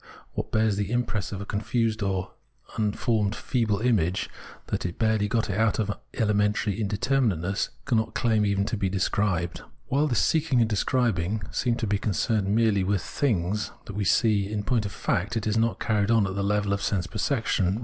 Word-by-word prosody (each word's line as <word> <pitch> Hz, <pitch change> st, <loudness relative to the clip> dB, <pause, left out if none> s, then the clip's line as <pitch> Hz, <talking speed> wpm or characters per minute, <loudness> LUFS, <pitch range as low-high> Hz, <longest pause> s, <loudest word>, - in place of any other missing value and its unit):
What -, -, -4 dB
bears 110 Hz, -2 st, +2 dB
the 100 Hz, 0 st, -1 dB
impress 120 Hz, -4 st, -1 dB
of 100 Hz, -1 st, -5 dB
a -, -, -5 dB
confused 110 Hz, +2 st, -1 dB
or 95 Hz, -2 st, -1 dB, 0.4 s
unformed 105 Hz, -1 st, 0 dB
feeble 110 Hz, -5 st, 0 dB
image, 95 Hz, -8 st, +1 dB, 0.3 s
that -, -, -2 dB
has 90 Hz, -, -3 dB
barely 110 Hz, -1 st, +1 dB
got 115 Hz, +1 st, 0 dB
out 105 Hz, +2 st, +1 dB
of 105 Hz, -2 st, -1 dB, 0.2 s
elementary 105 Hz, -1 st, +1 dB
indeter 110 Hz, +7 st, +1 dB
minateness, 95 Hz, -3 st, 0 dB, 0.2 s
cannot 115 Hz, -4 st, 0 dB
claim 110 Hz, -3 st, +2 dB
even 100 Hz, -1 st, +1 dB
to 115 Hz, -, -2 dB
be 100 Hz, -1 st, 0 dB
described. 95 Hz, -2 st, 0 dB, 0.3 s
While 145 Hz, +3 st, +2 dB
this 120 Hz, -, 0 dB
seeking 155 Hz, -5 st, +2 dB
and 115 Hz, -, +4 dB
describing 110 Hz, -3 st, 0 dB
seem 120 Hz, -2 st, 0 dB
to 115 Hz, -, -2 dB
be 100 Hz, -1 st, 0 dB
con 105 Hz, 0 st, -1 dB
cerned 105 Hz, +2 st, +1 dB
merely 105 Hz, -1 st, +3 dB
with 95 Hz, -1 st, 0 dB
things, 105 Hz, -6 st, 0 dB, 0.2 s
we 105 Hz, +1 st, -2 dB
see 100 Hz, 0 st, +3 dB
that 105 Hz, -, -6 dB
in 105 Hz, -, -2 dB
point 115 Hz, -2 st, +1 dB
of -, -, -8 dB
fact 100 Hz, +4 st, -1 dB
it 110 Hz, -, -2 dB
is 110 Hz, 0 st, 0 dB
not 115 Hz, 0 st, +1 dB
carried 105 Hz, -2 st, +1 dB
on 115 Hz, -3 st, +4 dB
at 95 Hz, -, -3 dB
the 100 Hz, -, -2 dB
level 105 Hz, 0 st, +1 dB
of 100 Hz, -, -1 dB
sense 100 Hz, -3 st, 0 dB
perception. 105 Hz, -, 0 dB
105 Hz, 190 wpm, -26 LUFS, 100-115 Hz, 0.4 s, and